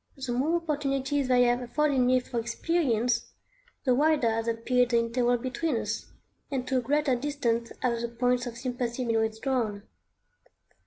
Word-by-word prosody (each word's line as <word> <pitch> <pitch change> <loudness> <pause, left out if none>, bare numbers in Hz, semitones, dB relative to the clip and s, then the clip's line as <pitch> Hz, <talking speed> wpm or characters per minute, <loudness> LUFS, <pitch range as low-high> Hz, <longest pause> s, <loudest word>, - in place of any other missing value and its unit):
The 260 -2 -4
more 285 +7 +1
opportunities 285 -4 -1
they 250 -1 +5
have 245 0 +2
afforded 280 +3 +1
me 255 0 +4
for 245 -1 -4
experience, 235 -2 0 0.5
the 255 - +3
wider 285 -3 +3
has 225 +1 -2
appeared 245 +2 +1
the 235 - +3
interval 240 +1 +2
between 260 +3 -2
us, 210 -1 -3 0.4
and 260 -3 -3
to 265 - +1
a - - -2
greater 285 +1 +1
distance 240 -4 -1
have 235 -2 +1
the 235 - -1
points 245 +1 0
of 235 -1 -7
sympathy 245 0 -3
been 230 -1 +1
withdrawn. 220 -1 -1
250 Hz, 160 wpm, -28 LUFS, 235-270 Hz, 0.5 s, they